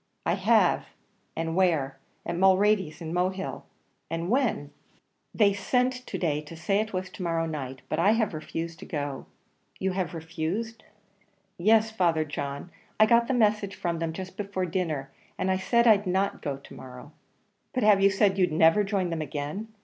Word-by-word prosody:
"I - - +2
have." - - +3 0.5
"And 165 0 -2
where?" 155 -8 +1 0.3
"At - - -2
Mulready's 190 -3 +3
in 165 0 -5
Mohill." 185 +2 -2 0.4
"And 165 +3 -3
when?" 235 - 0 0.6
"They 205 -3 +3
sent 250 +5 +1
to - - -4
day 150 -4 0
to 150 +2 -11
say 185 +5 0
it 215 0 -2
was 185 0 -4
to - - -10
morrow 165 -2 0
night, 135 -5 -5
but 155 - -2
I 200 +5 +5
have 220 -4 0
refused 165 +1 -5
to - - -9
go." 145 -5 -4 0.5
"You 190 0 -1
have 185 -2 -3
refused?" 175 +8 -4 0.8
"Yes, 220 +4 +4
Father 170 -7 +1
John. 140 +2 -5 0.3
I 215 - +8
got 235 +1 +4
the 260 - +1
message 215 -3 +2
from 170 -1 -2
them 165 -1 -2
just 185 +3 -8
before 195 -2 -2
dinner, 160 -6 -2 0.3
and 190 - 0
I 185 - +2
said 235 +5 +2
I'd 210 -3 +5
not 190 +2 0
go 140 -2 -3
to 140 - -14
morrow." 130 +2 -11 0.6
"But 255 - -1
have 210 -2 +5
you 195 - +6
said 195 0 +2
you'd 180 -3 +3
never 165 +6 +5
join 195 -3 -1
them 165 -1 -2
again? 150 +8 -4
180 Hz, 180 wpm, -27 LUFS, 160-205 Hz, 0.8 s, I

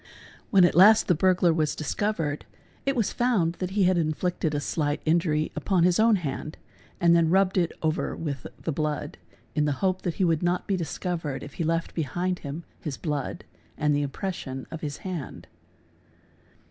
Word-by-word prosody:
When 195 -6 +6
at 175 - +2
last 210 +5 +7
the 180 - +5
burglar 180 0 +3
was 155 -2 0
discovered 160 -3 -2 0.4
it 275 - +2
was 230 -5 0
found 215 -10 +2
that 185 - -2
he 195 +1 +1
had 180 -1 +3
inflicted 160 0 -1
a - - +1
slight 145 0 -1
injury 155 -1 +1
upon 185 -4 +1
his 180 +1 +3
own 225 0 +5
hand 155 -3 -4 0.4
and 170 0 +5
then 165 -1 +4
rubbed 190 +1 +3
it 175 -3 +2
over 155 0 0
with 140 -6 -4
the 165 - -3
blood 150 0 -3 0.3
in 150 -1 +1
the 145 - +1
hope 185 0 +1
that 170 -3 -2
he - - 0
would 165 -3 +2
not 175 0 0
be 195 - 0
discovered 165 -3 -3
if 145 - -9
he 170 - -3
left 165 +1 -1
behind 175 +4 -2
him 145 +3 -6 0.2
his 145 -4 -5
blood 150 -4 -3 0.3
and 150 -1 +2
the 145 - +1
impression 140 -3 -4
of 165 - -6
his 145 -2 -4
hand. 175 -7 -5
165 Hz, 185 wpm, -26 LUFS, 150-185 Hz, 0.4 s, last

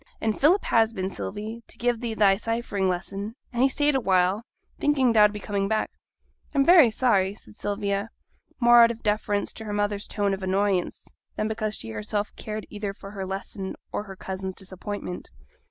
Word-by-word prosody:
and 220 -1 -1
Philip 345 +8 +5
has 225 0 +3
been, 190 -2 -3
Sylvie, 215 +4 -5
to - - -9
give 240 -1 0
thee 230 -2 -2
thy 200 -2 +5
ciphering 220 -3 -1
lesson; 195 +4 -4 0.2
and 240 - 0
he 270 - +5
stayed 290 +2 +2
awhile, 190 -5 +2 0.4
thinking 270 -5 +3
thou'd 210 -2 +6
be 210 - -6
coming 200 -1 -1
back.' 220 +1 0 0.6
'I'm 275 -1 +4
very 335 -7 +8
sorry,' 205 -4 +2
said 105 - -12
Sylvia, 200 - -2 0.5
more 240 -1 +7
out 230 - +6
of 230 0 -6
deference 210 -1 0
to 220 - -8
her 210 - -4
mother's 205 0 -1
tone 205 -2 0
of 195 - -4
annoyance, 190 -1 0 0.3
than 215 - -1
because 215 -1 -2
she 110 - -6
herself 110 - -3
cared 215 0 -5
either 205 -1 -4
for 195 - -10
her 195 -2 -5
lesson 195 0 -5 0.2
or 205 - -3
her 195 -1 -9
cousin's 190 0 -5
disappointment. 190 -1 -6
205 Hz, 185 wpm, -26 LUFS, 195-225 Hz, 0.6 s, very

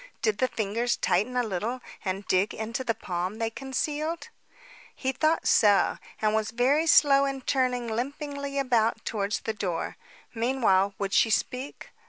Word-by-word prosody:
Did 215 -2 +1
the 255 - +3
fingers 230 +1 -1
tighten 250 +4 +1
a 245 - +3
little 220 +4 -3 0.2
and 195 +1 -3
dig 190 +3 +1
into 225 +4 -3
the 230 -3 0
palm 180 +2 -3
they 225 -1 -1
concealed? 300 +6 -3 0.7
He 265 - -1
thought 310 +5 +1
so, 205 -2 +4 0.2
and 215 0 +1
was 220 0 0
very 270 +8 +2
slow 280 -2 +6
in 275 -1 -3
turning 250 -2 0
limpingly 280 +4 -4
about 230 -4 +1
towards 205 -1 -2
the 220 - -3
door. 185 -5 -3 0.4
Meanwhile, 225 -5 +2
would 200 0 -3
she 225 - +4
speak? 255 +5 -2
235 Hz, 155 wpm, -27 LUFS, 210-270 Hz, 0.7 s, slow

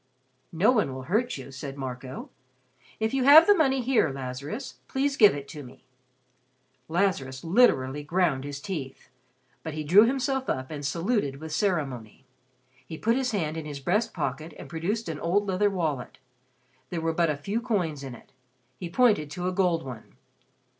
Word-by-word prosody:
"No 180 +8 +3
one 210 - +1
will 130 - -6
hurt 210 - 0
you," 135 0 -9
said 135 +1 -7
Marco. 130 -1 -6 0.7
"If 220 +2 0
you 270 -1 +1
have 305 +4 +10
the 410 - +7
money 270 -8 +2
here, 245 - +2
Lazarus, 135 - -6
please 275 +1 0
give 210 - +6
it 140 -1 -7
to 150 - -8
me." 130 -2 -14 1.0
Lazarus 160 -7 0
literally 150 - +3
ground 155 -3 0
his 145 -1 -6
teeth. 145 -8 -6 0.5
But 160 -2 -6
he 155 - -3
drew 190 +9 +7
himself 265 +1 -1
up 130 +2 -2
and 145 -2 -6
saluted 165 - 0
with 155 +3 -8
ceremony. 135 - -2 0.6
He 160 +5 -8
put 230 +6 +1
his 260 -1 0
hand 165 -8 -2
in 160 - -5
his 145 -2 -6
breast 195 - 0
pocket 155 0 -4
and - - -9
produced 175 +9 -3
an 155 -2 -4
old 195 +5 +1
leather 195 +2 +2
wallet. 160 -9 -3 0.7
There 175 - -3
were 165 0 -1
but 170 0 +2
a 150 - -1
few 200 +10 -2
coins 180 - -1
in 130 -3 -7
it. - - -18 0.5
He 175 - -5
pointed 205 - +3
to 180 +3 -4
a - - 0
gold 180 -3 +1
one. 125 -4 -10
165 Hz, 175 wpm, -27 LUFS, 140-210 Hz, 1.0 s, have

